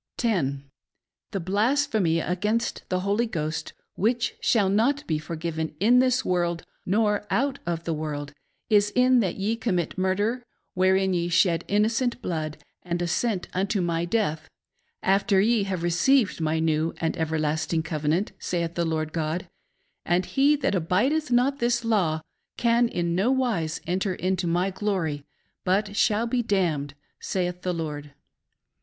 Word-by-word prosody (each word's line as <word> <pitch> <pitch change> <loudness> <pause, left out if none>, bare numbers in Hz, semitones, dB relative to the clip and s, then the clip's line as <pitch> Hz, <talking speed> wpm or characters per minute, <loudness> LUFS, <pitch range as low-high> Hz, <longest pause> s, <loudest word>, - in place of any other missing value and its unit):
10. 145 - 0 0.7
The 195 - -3
blasphemy 205 - +1
against 210 +7 -1
the 185 0 0
Holy 205 +5 +1
Ghost, 155 -6 -3 0.2
which 235 +4 0
shall 210 -5 +3
not 240 +9 +2
be 155 -2 -1
forgiven 160 0 -4
in 235 +6 +5
this 255 0 +2
virorld, 175 -2 0 0.2
nor 210 +1 +1
out 275 +2 0
of 170 -1 -2
the 165 - -2
vf 155 - -4
orld, 145 -2 -4 0.3
is 210 -1 +4
in 250 0 +5
that 195 -6 0
ye 205 +4 -1
commit 185 -7 -2
murder, 205 +6 0 0.3
wherein 190 +1 +2
ye 175 -1 0
shed 170 -1 +3
inno 210 +2 +3
cent 245 +1 -1
blood, 155 -7 -3 0.2
and 175 -1 -3
assent 180 +3 -1
unto 195 +2 0
my 170 -2 0
death, 170 -5 -1 0.5
after 195 +1 +3
ye 215 0 +3
have 185 -3 -3
received 185 +5 +2
my 160 0 +1
new 160 0 0
and 165 -1 -1
ever 160 0 -1
lasting 155 +1 0
covenant, 160 +4 -1
saith 170 -2 -2
the 170 -1 -1
Lord 155 -1 -2
God; 165 +2 -2 0.6
and 175 +2 +1
he 280 +7 +3
that 275 -5 0
abidcth 215 - +1
not 255 +3 +2
this 240 -1 +1
law 180 -9 +1 0.4
can 235 0 +3
in 170 -6 -1
no 190 +7 +2
wise 235 -12 0
enter 185 +2 -1
into 185 -1 -1
my 175 +3 +1
glory, 180 -8 -2 0.4
but 200 +2 0
shall 215 +1 +2
be 240 +1 0
damned, 165 -10 0 0.2
saith 180 -1 -2
the 180 - -1
Lord. 150 -4 -5
185 Hz, 155 wpm, -25 LUFS, 165-225 Hz, 0.7 s, in